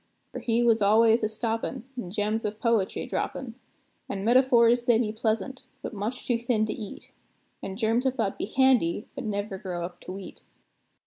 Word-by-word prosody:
For - - -5
he 235 0 +1
was 230 -2 +4
al'ays 220 +3 +5
a 215 - +1
stoppin', 225 +1 -3
and 215 -8 -6
gems 210 +3 -1
of 210 0 -3
poetry 230 -5 +1
droppin'; 255 -4 -3 0.6
And 195 0 -3
metaphors, 240 -1 +5
they 240 -2 +5
be 225 -2 0
pleasant, 230 +4 -2 0.2
but - - -5
much 215 +5 -4
too 240 -2 +1
thin 230 -2 +1
to 215 - -3
eat; 210 -3 -8 0.5
And 190 0 -6
germs 230 +3 +1
of 260 - 0
thought 220 -6 -1
be - - -1
handy, 240 -5 +3
but 270 -3 -6
never 205 -2 -3
grow 175 -3 -4
up 175 0 -9
to - - -8
wheat. 195 0 -9
225 Hz, 185 wpm, -27 LUFS, 205-240 Hz, 0.6 s, al'ays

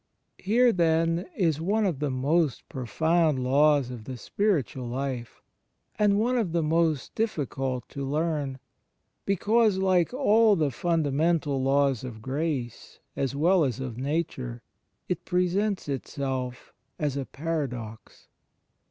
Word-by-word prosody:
Here, 235 +5 +3
then, 165 0 +1
is 160 -6 +1
one 210 +5 +1
of 170 -8 -1
the 150 -1 -1
most 140 +2 0
profound 160 +4 +1
laws 140 0 +3
of 115 -3 -8
the 130 -1 -6
spiritual 145 - -1
life, 125 -1 -4 0.6
and 205 -1 +4
one 245 +3 +2
of 185 -8 -1
the 170 -1 +1
most 160 -2 +1
difficult 135 - -2
to 140 - -5
learn, 145 -1 -1 0.7
because, 210 +2 +3
like 185 -3 +2
all 225 -5 +4
the 155 -5 +1
fundamental 155 -1 +1
laws 135 -2 +2
of 120 -4 -7
grace, 135 0 -4 0.2
as 135 0 -2
well 170 +4 +4
as 130 -5 -1
of 125 -3 -5
nature, 130 -5 -3 0.4
it 180 - -2
presents 185 +2 0
itself 130 -2 -4 0.2
as 145 -3 -1
a 140 -2 -3
paradox. 130 -8 -5
150 Hz, 125 wpm, -27 LUFS, 130-175 Hz, 0.7 s, and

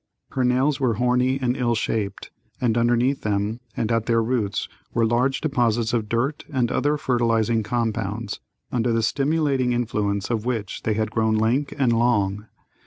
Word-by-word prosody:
Her 130 - 0
nails 130 +3 +2
were 125 -5 +1
horny 125 +3 +2
and 125 -1 0
ill 120 -3 +1
shaped, 110 -2 -2 0.3
and 120 -3 +1
underneath 120 +3 +2
them 105 +2 -1 0.2
and 115 0 -1
at 115 -1 0
their 115 -1 +3
roots 110 -4 -1 0.3
were 115 - +3
large 125 +4 +1
deposits 120 -6 +1
of 110 -3 -1
dirt 125 +6 -1
and 125 -4 0
other 145 +1 +1
fertilizing 115 -4 +1
compounds, 110 -1 -2 0.3
under 120 -1 +1
the 115 0 +1
stimulating 140 -1 +1
influence 105 -4 -1
of 110 -2 -1
which 115 -5 -3
they 110 - 0
had 110 0 -1
grown 110 -1 +1
lank 120 +6 +1
and 130 -4 +3
long. 105 -3 +1
120 Hz, 165 wpm, -23 LUFS, 110-125 Hz, 0.3 s, their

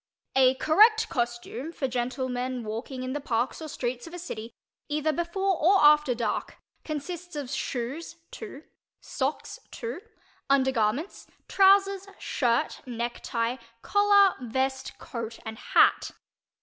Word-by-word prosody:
_" - - -67 0.4
A 260 0 +5
correct 435 - +4
costume 240 +4 -3
for 285 -5 -2
gentlemen 255 0 -2
walking 235 +4 -5
in 255 0 -3
the 290 - -3
parks 240 +3 -1
or 315 - -5
streets 245 -1 -4
of 335 - -9
a - - -5
city, 235 -10 -7 0.4
either 305 +1 0
before 360 +4 0
or 385 +5 +6
after 300 -3 +5
dark, 235 - -3 0.3
consists 345 +3 -6
of 280 -3 -5
shoes 265 +5 -4 0.2
(2), 390 -10 -9 0.4
socks - - -3
(2), 460 -6 -6 0.5
undergarments, 265 - +1 0.2
trousers, 390 0 +4
shirt, 235 -3 0
necktie, 235 0 -2 0.3
collar, 405 -1 +5
vest, 265 +2 -2
coat 230 -2 -6
and 220 +1 -7
hat. - - +3
270 Hz, 125 wpm, -27 LUFS, 240-345 Hz, 0.5 s, or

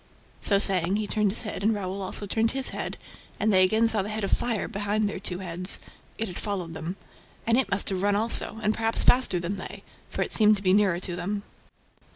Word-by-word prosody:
So 200 - +2
saying, 190 -2 +4
he 215 0 -1
turned 210 0 0
his 220 - -1
head 215 - -5
and 215 +2 +1
Raoul 195 -1 -5
also 195 +2 -2
turned 220 +3 0
his 270 -1 +1
head; - - -4 0.4
and 215 0 +1
they 185 0 +6
again 220 +5 +3
saw 220 -2 +3
the 200 - -5
head 215 0 -4
of 195 - -2
fire 230 -4 -1
behind 210 0 -1
their 205 - -5
two 185 -2 -3
heads. 185 0 0 0.4
It 225 - -2
had 180 - -7
followed 185 -6 -4
them. 165 +3 -6 0.5
And 230 - +2
it 265 - +1
must 200 - +1
have 190 -2 -3
run 205 0 +1
also, 225 0 +3
and 215 +1 +1
perhaps 225 0 +1
faster 245 -8 +4
than 175 +4 -4
they, - - -8 0.3
for - - -2
it - - -3
seemed 215 -1 +5
to 195 - -9
be 185 -1 +3
nearer 195 -4 +2
to 180 -1 -5
them. 200 +3 -4
205 Hz, 230 wpm, -26 LUFS, 185-215 Hz, 0.5 s, they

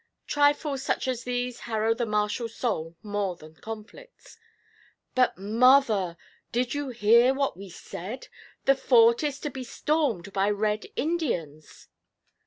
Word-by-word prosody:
Trifles 290 -1 +2
such 270 - -1
as 250 -2 -2
these 245 0 -2
harrow 220 0 +1
the 235 0 -2
martial 210 +2 -1
soul 185 -9 -3
more 205 -3 -2
than 155 -1 -14
conflicts. 225 - -11 0.8
'But, 255 -1 +2
mother, 215 -3 +3 0.3
did 240 0 0
you 290 -1 -3
hear 235 +2 +4
what 275 -6 0
we 195 +1 -10
said? 190 +6 -8 0.4
The 275 - +6
fort 235 -3 +4
is 290 -3 -1
to 295 - -3
be 260 0 -6
stormed 245 - -1
by 195 +1 +2
Red 210 +1 -1
Indians!' 180 - -3
235 Hz, 135 wpm, -27 LUFS, 205-265 Hz, 0.8 s, The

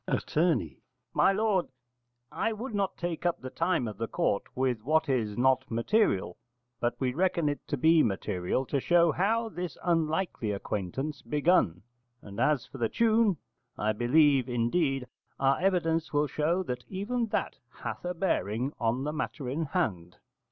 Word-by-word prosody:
Att. - - -2 0.8
My - - +4
lord, 195 -3 +1 0.6
I 225 - -1
would 230 +3 -6
not 200 -2 -1
take 170 -1 -3
up 175 -1 0
the 130 0 -7
time 165 -7 0
of 105 -2 -7
the 115 - -1
court 100 - 0
with 125 -3 0
what 160 +4 +2
is 115 -6 0
not 130 +1 +2
material: 115 - +1 0.4
but 120 - -1
we 125 -2 0
reckon 170 0 +1
it 145 0 -1
to 145 - -2
be 160 +4 +5
material 100 +2 -1
to 140 - -1
show 170 +3 +4
how 225 +7 +1
this 180 -5 -5
unlikely 165 - 0
acquaintance 105 +9 -4
begun: 145 - +2 0.4
and 100 -1 -10
as 135 0 +2
for 135 - -11
the 115 -2 +1
tune, 225 -4 +3 0.4
I 105 +1 +1
believe, 135 +3 +3
indeed, 130 +3 0 0.3
our 135 0 +3
evidence 165 -4 +1
will 145 0 +2
show 155 +6 0
that 125 -6 -4
even 225 +5 -2
that - - -2
hath - - -7
a 180 0 -3
bearing 130 - -1
on 120 +3 0
the 150 +1 -2
matter 150 -3 -4
in 155 +5 -1
hand. 100 - -2
150 Hz, 160 wpm, -29 LUFS, 120-180 Hz, 0.8 s, be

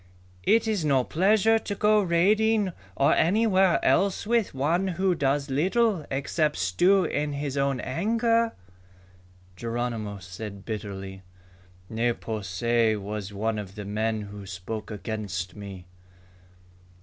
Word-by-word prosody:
It 225 0 +4
is 210 -6 0
no 135 -4 +3
pleasure 215 - +3
to 205 -2 -4
go 210 +1 +4
raiding 205 +3 +2 0.2
or 140 - +4
anywhere 190 -1 +3
else 195 0 +2
with 230 -1 +1
one 165 +8 +1
who 185 +1 +1
does 140 -2 0
little 190 - +1
except 150 +3 0
stew 175 - +3
in 150 -1 -1
his 140 -1 -3
own 140 -2 0
anger." 230 - +1 1.0
Geronimo 115 -1 -3
said 100 +2 -8
bitterly, 95 -3 -6 0.7
"Ne 115 +3 0
po 110 -2 -5
se 110 +4 +1
was 105 0 -5
one 110 +2 -2
of 100 -1 -8
the 105 -2 -6
men 110 +2 -1
who 100 -1 -9
spoke 100 +3 -6
against 100 -4 -4
me." 100 -3 -9
135 Hz, 125 wpm, -26 LUFS, -, 1.0 s, It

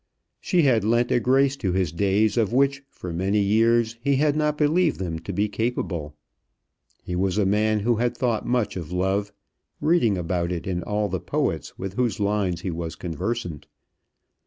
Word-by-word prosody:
She 175 -3 +2
had 120 -7 +3
lent 120 +3 +2
a - - +4
grace 135 +3 +3
to 95 -9 -1
his 90 -4 0
days 100 +4 +1
of 115 -4 +1
which 135 +2 +2
for 90 -2 -7
many 95 +5 0
years 115 +3 +2
he 140 +2 +2
had 145 +1 +2
not 150 -1 0
believed 155 +1 +2
them 85 -4 -3
to 95 - -6
be 100 +3 0
capable. 95 -9 -3 0.9
He 90 - -4
was 95 +1 0
a 105 - +3
man 105 +2 +2
who 115 +2 +1
had 120 +1 0
thought 120 -4 0
much 120 -4 0
of 85 -3 -6
love, 95 +3 0 0.5
reading 150 - +2
about 85 0 -1
it 85 -2 -4
in 90 -2 -2
all 105 +3 -1
the 95 -1 -3
poets - - -2
with 95 0 -5
whose 115 -2 -1
lines 100 -4 0
he 95 - -3
was 80 0 -5
conversant. 90 -1 -4
105 Hz, 185 wpm, -24 LUFS, 90-120 Hz, 0.9 s, a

